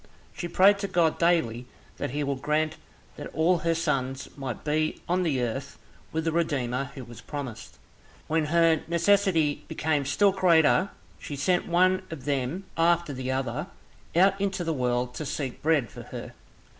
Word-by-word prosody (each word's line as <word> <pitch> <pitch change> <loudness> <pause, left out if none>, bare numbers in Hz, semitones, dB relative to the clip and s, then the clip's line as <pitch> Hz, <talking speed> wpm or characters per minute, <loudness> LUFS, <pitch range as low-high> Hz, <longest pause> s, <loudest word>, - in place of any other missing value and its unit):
She 175 - -4
prayed 195 +4 +5
to 200 - -2
God 170 -4 +2
daily 125 -9 +1 0.3
that - - -3
he 145 +3 -2
would 140 -2 -2
grant 155 +2 0 0.4
that - - -6
all 170 +3 +3
her 165 +1 0
sons 135 -5 -1
might 130 -5 -5
be 155 +1 0
on 180 +2 +1
the 145 -8 0
earth 135 +4 -4 0.3
with 160 0 -1
the 165 - +1
Redeemer 135 -6 0
who 135 - -7
was 120 -1 -11
promised. 130 -7 -7 0.5
When 160 0 +1
her 165 0 +3
necessity 170 -3 +2
became 155 -3 0
still 195 +9 +3
greater 180 -1 +4 0.3
she 145 - -6
sent 175 +6 +1
one 185 +2 +3
of 155 -5 -8
them 140 +5 -1
after 170 -2 +2
the 130 0 -4
other 130 -2 -2 0.5
out 195 +3 +4
into 195 -3 -1
the 165 -1 -1
world 125 -2 -1
to 155 - -5
seek 135 -3 -4
bread 150 -7 +2
for - - -9
her. - - -8
155 Hz, 170 wpm, -27 LUFS, 135-170 Hz, 0.5 s, prayed